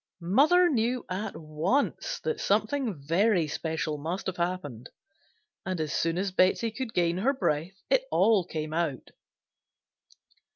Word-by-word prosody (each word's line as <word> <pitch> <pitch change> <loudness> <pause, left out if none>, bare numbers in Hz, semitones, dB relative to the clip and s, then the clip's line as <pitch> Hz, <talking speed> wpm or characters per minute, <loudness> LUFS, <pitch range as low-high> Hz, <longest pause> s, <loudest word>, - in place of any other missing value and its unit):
Mother 290 - +4
knew 245 -3 0
at 195 +4 -3
once 160 - -1
that 470 - -2
something 215 - 0
very 170 +4 +2
special 155 0 -3
must 170 +6 -4
have 185 - -3
happened 170 -9 -3 0.7
and 185 -2 -3
as 155 -2 -2
soon 165 +1 0
as 195 +1 -1
Betsey 185 +5 +2
could 230 0 -6
gain 175 0 +1
her 265 +8 +2
breath 185 - -2
it - - +2
all 220 - +4
came 155 -2 -5
out. 160 -5 -2
185 Hz, 135 wpm, -28 LUFS, 160-225 Hz, 0.7 s, Mother